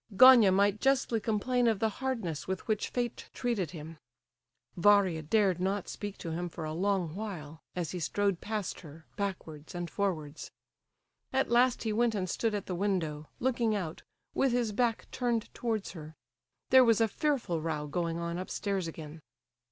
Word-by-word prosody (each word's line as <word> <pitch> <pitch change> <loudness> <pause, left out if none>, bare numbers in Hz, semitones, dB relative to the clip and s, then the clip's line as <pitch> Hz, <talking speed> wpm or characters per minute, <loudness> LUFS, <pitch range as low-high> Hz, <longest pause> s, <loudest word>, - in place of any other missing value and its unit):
Gania 250 -6 +9
might 200 +2 +2
justly 265 -4 +2
complain 235 +3 +1
of 225 -2 +3
the 220 - +1
hardness 225 - -2
with 190 0 -4
which 215 -2 0
fate 240 -1 -3
treated 230 - -1
him. 160 -1 -9 0.8
Varia 190 -3 +4
dared 190 +2 +2
not 195 +1 -1
speak 205 -1 -6
to 165 - -5
him 175 +2 -3
for 165 -1 -6
a 155 - -3
long 185 -2 0
while, 165 -7 -6
as 175 -4 -2
he 180 - -4
strode 200 +2 0
past 210 -3 -3
her, 160 -1 -13
backwards 170 -6 -5
and 175 -2 -4
forwards. 160 -7 -3 0.8
At 265 -2 +1
last 245 +1 +4
he 220 -2 -1
went 230 0 +2
and 185 -2 -1
stood 220 +4 -1
at 205 - -3
the 185 - -4
window, 170 -6 -1
looking 235 -3 +1
out, 170 -5 -4 0.3
with 270 -3 +2
his 240 -3 +1
back 230 +1 0
turned 240 -3 -1
towards 225 -4 -2
her. 155 -2 -10 0.6
There 260 0 +9
was 230 -2 +4
a 225 - +4
fearful 240 - -1
row 155 -2 -2
going 165 +2 -2
on 170 +1 -3
upstairs 190 -1 -2
again. 155 -1 -8
200 Hz, 170 wpm, -31 LUFS, 165-225 Hz, 0.8 s, Gania